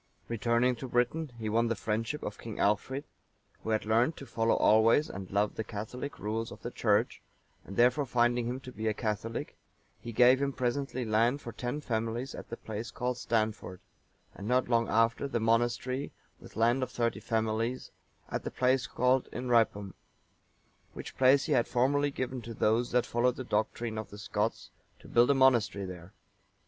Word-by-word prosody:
Returning 120 +2 +1
to 130 - -6
Britain, 125 +5 0
he 110 -2 -4
won 115 +2 +2
the 115 - 0
friendship 110 +7 -2
of - - -5
King 115 -2 -7
Alchfrid,(902) 120 +7 +1 0.6
who - - -4
had 110 -1 0
learnt 115 +8 +2
to 140 - -8
follow 115 -2 +1
always 110 +7 +4
and 95 0 -7
love 100 +1 +1
the 110 - -3
catholic 125 +7 -6
rules 110 +2 -3
of - - -11
the - - -4
Church; - - +1 0.4
and 100 - -9
therefore 125 +4 +4
finding 120 -1 +2
him 125 +2 -3
to 130 - -9
be 110 -2 -4
a 110 - +1
Catholic, 110 0 -3 0.4
he 120 - -7
gave 125 +4 +5
him 140 -1 0
presently 130 0 -2
land 115 +6 +2
of 115 -2 -7
ten 125 +5 -3
families 115 +1 -2
at - - -9
the 115 - -5
place 110 +1 -6
called 125 0 -3
Stanford;(903) 110 -8 -4
and 100 - -6
not 125 +2 +2
long 115 -1 +2
after, 115 +5 +2
the 125 -4 -1
monastery, 120 +4 0 0.3
with - - -14
land 120 +4 +2
of 130 - -1
thirty 115 -1 -1
families, 115 +2 -1 0.4
at - - -2
the - - -3
place 125 0 +1
called 125 +1 +1
Inhrypum;(904) 115 -5 +1 1.0
which - - -8
place 135 +2 +5
he - - -3
had 120 -3 +3
formerly 145 +4 +2
given 130 -2 -4
to 115 0 -8
those 115 +3 +2
that 125 -1 +2
followed 120 +1 +1
the 130 - -5
doctrine 110 0 -2
of 110 - -6
the 105 - -10
Scots, 105 +2 -2 0.3
to - - -15
build 120 +2 +4
a 140 - +5
monastery 120 -7 +3
there. 90 0 -9
120 Hz, 180 wpm, -30 LUFS, 110-125 Hz, 1.0 s, gave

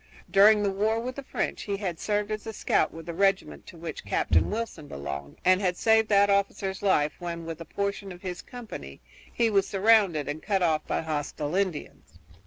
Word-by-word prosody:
During 210 +2 +6
the 200 - +1
war 215 +3 +1
with 250 +2 -4
the 280 - -5
French 265 - -3
he 200 -1 -3
had 185 -5 -4
served 210 0 -1
as 215 +1 -4
a 220 - -4
scout - - +1
with 165 0 -10
the 170 - -5
regiment 195 +2 0
to 175 - -11
which 165 -2 -6
Captain 95 -4 +2
Wilson 210 -8 -4
belonged, 70 - -6
and 185 +1 +5
had 180 -2 0
saved 220 -1 +4
that 200 -1 +5
officer's 200 -1 0
life 155 -7 +2
when 170 -2 -5
with 165 0 -6
a - - -7
portion 200 +1 -3
of 180 +1 -11
his 180 -2 -5
company, 215 - -9 0.3
he 230 -2 +1
was 195 -2 +3
surrounded 195 -6 +3
and 155 +2 -4
cut 195 -3 0
off 155 -2 +1
by - - 0
hostile 150 -1 -3
Indians. 185 -5 -3
195 Hz, 200 wpm, -27 LUFS, 165-210 Hz, 0.3 s, During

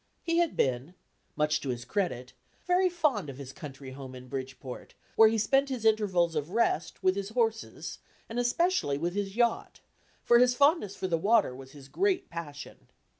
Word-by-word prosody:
He 335 0 0
had 340 -2 +1
been 130 +7 0 0.4
(much 150 0 +1
to 140 - -4
his 120 -1 -3
credit) 130 -12 -2 0.3
very 365 +1 +3
fond 295 - 0
of 135 - -8
his 135 -1 -8
country 140 -6 -9
home 130 -1 -9
in 125 0 -11
Bridgeport, 130 -1 -7 0.2
where 220 -1 +7
he 225 - 0
spent 270 +6 +2
his 250 -4 -4
intervals 195 -6 +2
of 150 0 -2
rest 180 -6 0
with 185 0 +3
his 200 0 -3
horses, 225 -1 -2 0.3
and 230 +2 -4
especially 245 - +1
with 170 +4 -2
his 200 0 -3
yacht, 235 -1 0 0.4
for 240 - +5
his 250 0 +4
fondness 280 - +3
for - - -5
the 165 -3 0
water 205 - +3
was 130 0 -12
his 140 -2 -13
great 375 - 0
passion. 150 -4 -8
190 Hz, 180 wpm, -29 LUFS, -, 0.4 s, where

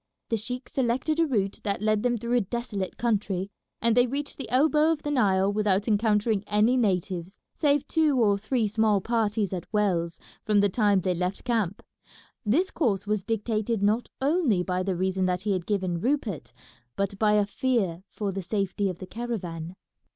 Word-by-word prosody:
The 225 - +1
sheik 250 +4 -5
selected 265 +5 0
a 330 - +4
route 200 -7 -1
that 200 -1 -2
led 215 -1 +2
them 240 0 +1
through 235 +2 -3
a 245 - +4
desolate 205 -2 -4
country, 200 -4 -1 0.3
and 230 -1 +3
they 245 0 +5
reached 280 +3 -4
the 275 - -7
elbow 300 +4 +4
of 315 -2 -2
the 295 - -2
Nile 200 -6 +2
without 205 -1 +1
encountering 210 -1 +2
any 215 +4 +3
natives, 185 -5 -1 0.2
save 290 -2 +1
two 305 -5 +2
or 205 -3 +4
three 220 +1 0
small 215 -1 +2
parties 215 -2 0
at 180 -3 -6
wells, 175 -6 0 0.3
from 210 -2 +3
the 200 0 +3
time 205 -1 +2
they 180 +1 0
left 180 +2 -3
camp. 220 -6 -1 0.6
This 300 - +1
course 215 - 0
was 210 -1 0
dictated 220 0 -1
not 215 +4 +1
only 275 - +2
by 180 0 -1
the 185 0 -1
reason 185 +1 0
that 180 0 -1
he 210 - 0
had 185 -3 -2
given 185 -5 -1
Rupert, 215 - -1 0.4
but 200 0 -2
by 215 -1 +4
a 210 -1 +4
fear 205 -6 -1
for 205 -2 -3
the 195 +1 -4
safety 195 +1 -1
of 180 - -5
the 185 - -8
caravan. 185 -7 -5
210 Hz, 185 wpm, -26 LUFS, 190-240 Hz, 0.6 s, they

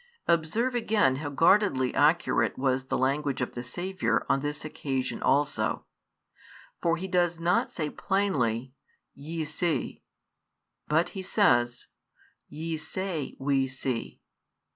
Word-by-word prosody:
Observe 170 +10 +1
again 215 - +2
how 145 +1 -4
guardedly 145 -3 +3
accurate 155 +4 +2
was 130 0 0
the - - -1
language 140 +1 0
of 125 - -2
the 120 - -4
Saviour 125 -3 -1
on 135 - +2
this 150 +2 -4
occasion 135 -4 -3
also; 145 +1 +1 1.0
for 170 0 +2
He 190 +3 -4
does 175 -2 +1
not 175 +2 +2
say 155 -3 -3
plainly, 130 - 0 0.4
"Ye 160 +2 -5
see," 160 +2 -2 0.9
but 160 +3 +2
He 195 - -6
says: 120 - +2 0.6
Ye 160 +2 -4
say, 170 -1 -4
We 135 -1 +1
see. 130 -2 -4
150 Hz, 120 wpm, -28 LUFS, 130-175 Hz, 1.0 s, guardedly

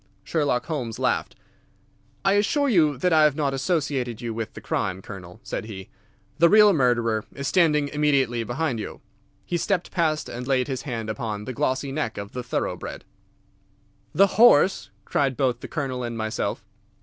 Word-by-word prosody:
Sherlock 145 -6 0
Holmes 125 -8 -4
laughed. - - -1 0.9
"I 195 - +4
assure 245 +8 +2
you 155 - +3
that 180 +6 +1
I 155 -1 +6
have 150 -2 +4
not 145 -3 0
associated 135 - -1
you 115 -1 -4
with 110 -1 -5
the - - -7
crime, 95 -1 -2
Colonel," 95 -1 -10
said 120 - -4
he. 95 -3 -9 0.5
"The 170 +1 +6
real 210 +1 +7
murderer 120 - +1
is 140 0 -4
standing 150 -5 +3
immediately 140 -6 +1
behind 125 +2 -2
you." - - -7 0.4
He 175 - -1
stepped 180 +1 -1
past 160 -4 0
and 125 +1 -6
laid 130 -1 +1
his 135 -3 -3
hand 115 -3 -3
upon 110 -1 -4
the 130 - -5
glossy 135 +1 -1
neck 135 -6 -3
of 100 0 -6
the 125 - -4
thoroughbred. 125 - -4 1.1
"The 195 - +5 0.2
horse!" 185 - +5 0.2
cried 135 -3 0
both 125 -4 +1
the - - -8
Colonel 135 -5 -3
and 120 -1 -4
myself. 110 0 -3
135 Hz, 170 wpm, -24 LUFS, 115-155 Hz, 1.1 s, real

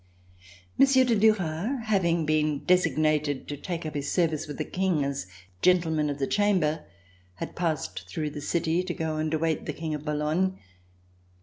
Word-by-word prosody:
Monsieur 270 -1 +6
de 240 -2 +2
Duras, 210 - +1
having 170 -6 +2
been 155 -1 +1
designated 155 -5 +2
to 145 - -4
take 170 +3 -5
up 155 - -4
his 145 -1 -3
service 160 -4 +1
with 145 - -7
the - - -2
King 180 -5 0
as 140 -7 -3 0.3
Gentleman 160 -4 +3
of 145 - -3
the 135 - 0
Chamber, 185 -5 +1 0.5
had - - -6
passed 160 -5 -2
through 155 -2 -3
the 145 - -7
city 165 +2 0
to 185 -1 -4
go 160 -1 -2
and 155 0 -1
await 160 0 -1
the - - -2
King 160 -1 -4
at 150 -1 -4
Boulogne. 155 +5 0
160 Hz, 170 wpm, -27 LUFS, 150-180 Hz, 0.5 s, Monsieur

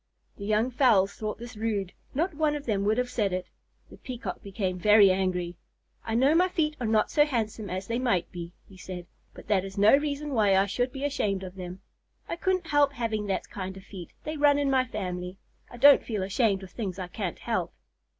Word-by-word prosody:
The 200 - -7
young 215 +4 +2
fowls 230 -7 +4
thought 215 -1 -4
this 240 +1 -9
rude. 210 -4 -2 0.2
Not 335 +5 0
one 300 0 +1
of 290 -1 -6
them 205 -4 0
would 215 +2 +2
have 250 0 -1
said 210 -6 0
it. 180 0 -2 0.5
The - - -12
Peacock 235 -8 -6
became 190 -2 -3
very 210 0 +7
angry. 180 -2 -1 0.5
"I 225 - -2
know 265 +5 +4
my 360 +3 +4
feet 310 -4 0
are 240 - -2
not 215 -1 +2
so 295 - +5
handsome 225 -7 -2
as 185 +2 -4
they 230 +3 -2
might 230 -9 0
be," 170 -1 -7 0.2
he 190 - -15
said, 180 -2 -7 0.3
"but - - -12
that 195 -3 +2
is 195 0 -8
no 205 +5 +7
reason 290 0 -2
why 205 -5 +4
I 195 - +4
should 245 +5 -1
be 275 0 -6
ashamed 205 -9 -1
of 185 -1 -7
them. 185 -1 -8 0.5
I - - -3
couldn't 370 0 0
help 290 -2 +3
having 220 -5 -2
that 195 - -2
kind 190 -1 -5
of 190 - -11
feet. 185 -4 -9
They 310 0 -4
run 290 -1 +5
in 285 -1 +1
my 260 -1 +3
family. 180 -5 -5 0.3
I 240 - -11
don't 280 +3 +7
feel 210 -5 -3
ashamed 195 0 +1
of 185 - -10
things 195 -5 -4
I 185 -2 -4
can't 180 -1 -4
help." - - -2
215 Hz, 220 wpm, -27 LUFS, 190-265 Hz, 0.5 s, very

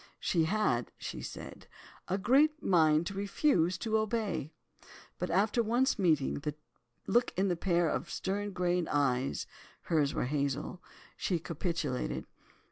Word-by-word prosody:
She 165 -3 +1
had 160 - +1
(she - - -6
said) - - -8 0.4
"a 190 - 0
great 280 +9 +3
mind 160 -3 +4
to 200 - -4
refuse 195 - +1
to 220 +2 0
obey," 215 - -2 0.7
but - - -2
after 210 +6 +2
once 240 +2 +1
meeting 155 -9 +2
the 150 0 -4 0.5
look 240 +1 +2
in 190 0 +2
a - - +1
pair 170 -1 +2
of - - -2
stern 205 +2 -2
grey 180 -1 +1
eyes—hers 140 +2 -1
were - - 0
hazel—she 145 +6 -3
capitulated. 165 -5 -3
180 Hz, 125 wpm, -31 LUFS, 155-210 Hz, 0.7 s, mind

